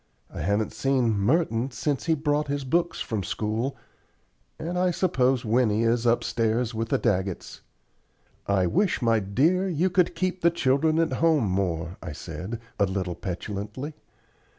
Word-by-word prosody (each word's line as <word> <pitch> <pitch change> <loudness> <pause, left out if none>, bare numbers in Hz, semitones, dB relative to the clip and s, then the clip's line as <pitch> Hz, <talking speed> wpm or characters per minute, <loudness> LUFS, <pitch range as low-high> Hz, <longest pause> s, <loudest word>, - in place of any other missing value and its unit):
I - - -5
haven't 100 +6 0
seen 130 -4 +1
Merton 115 - +1
since 135 +3 -2
he 160 - +4
brought 150 0 0
his 140 0 -2
books 170 +6 0
from 110 -3 -2
school, 110 +7 -2 0.8
and 175 +2 -4
I 180 0 +2
suppose 135 -9 +1
Winnie 110 -1 +2
is 115 +1 +2
upstairs 115 0 +1
with 115 0 -3
the - - +2
Daggetts." 95 -5 -2 0.9
"I 100 -2 +2
wish, 180 - +1
my 115 -1 +4
dear, 155 - +2
you 175 +2 +1
could 180 -1 +2
keep 185 +1 -1
the 170 - +5
children 155 -1 +2
at 165 -1 +2
home 160 -9 +3
more," 90 -2 -1
I 75 - -6
said, 105 +9 -6 0.2
a 100 - +4
little 95 -2 -2
petulantly. 105 - -5
120 Hz, 150 wpm, -26 LUFS, 105-160 Hz, 0.9 s, the